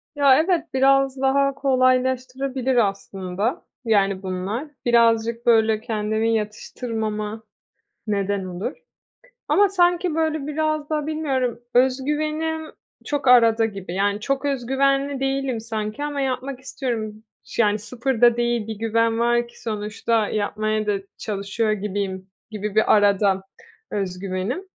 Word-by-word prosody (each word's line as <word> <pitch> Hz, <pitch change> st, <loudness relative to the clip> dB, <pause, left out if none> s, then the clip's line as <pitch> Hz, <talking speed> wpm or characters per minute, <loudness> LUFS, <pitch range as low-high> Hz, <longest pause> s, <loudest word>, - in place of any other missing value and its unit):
Ya 280 Hz, -2 st, +6 dB
evet, 335 Hz, 0 st, +1 dB
biraz 270 Hz, 0 st, +3 dB
daha 275 Hz, +1 st, +3 dB
kolaylaştırabilir 260 Hz, 0 st, +1 dB
aslında, 195 Hz, -, -1 dB, 0.2 s
yani, 200 Hz, -3 st, +2 dB
bunlar. 190 Hz, +9 st, -3 dB, 0.2 s
Birazcık, 230 Hz, 0 st, +3 dB
böyle, 220 Hz, -2 st, +4 dB
kendimi 220 Hz, 0 st, 0 dB
yatıştırmama 215 Hz, 0 st, -4 dB, 0.6 s
neden 200 Hz, -1 st, -1 dB
olur. 185 Hz, -, -4 dB, 0.8 s
Ama 405 Hz, 0 st, +5 dB
sanki, 355 Hz, -2 st, +2 dB
böyle, 315 Hz, -3 st, 0 dB
biraz 310 Hz, 0 st, -1 dB
da 300 Hz, -1 st, -1 dB
bilmiyorum, 270 Hz, -7 st, -1 dB, 0.2 s
öz 255 Hz, +1 st, +4 dB
güvenim 310 Hz, +2 st, -2 dB, 0.3 s
çok 290 Hz, -3 st, -1 dB
arada 230 Hz, -2 st, +6 dB
gibi, 195 Hz, -5 st, -5 dB
yani, 200 Hz, +2 st, 0 dB
çok 275 Hz, +4 st, -1 dB
öz 270 Hz, -4 st, -1 dB
güvenli 275 Hz, +1 st, +1 dB
değilim 270 Hz, -3 st, -1 dB
sanki 220 Hz, +3 st, -4 dB
ama 290 Hz, -1 st, -3 dB
yapmak 265 Hz, 0 st, -3 dB
istiyorum. 225 Hz, -6 st, -4 dB, 0.2 s
Ş 235 Hz, -, 0 dB
yani, 210 Hz, 0 st, +2 dB
sıfır 245 Hz, +3 st, -3 dB
da 240 Hz, -1 st, +6 dB
değil 240 Hz, -2 st, 0 dB
bir 220 Hz, -, -4 dB
güven 225 Hz, +1 st, +1 dB
var 240 Hz, 0 st, +2 dB
ki -, -, -18 dB
sonuçta 215 Hz, 0 st, -1 dB
yapmaya 215 Hz, +1 st, -1 dB
da 210 Hz, -, +2 dB, 0.3 s
çalışıyor 215 Hz, +1 st, -1 dB
gibiyim 195 Hz, -2 st, -3 dB, 0.2 s
gibi 210 Hz, -1 st, -4 dB
bir 220 Hz, -, +4 dB
arada 200 Hz, -1 st, +3 dB, 0.5 s
öz 190 Hz, -3 st, -2 dB
güvenim. 195 Hz, -, -3 dB
235 Hz, 130 wpm, -23 LUFS, 210-270 Hz, 0.8 s, Ya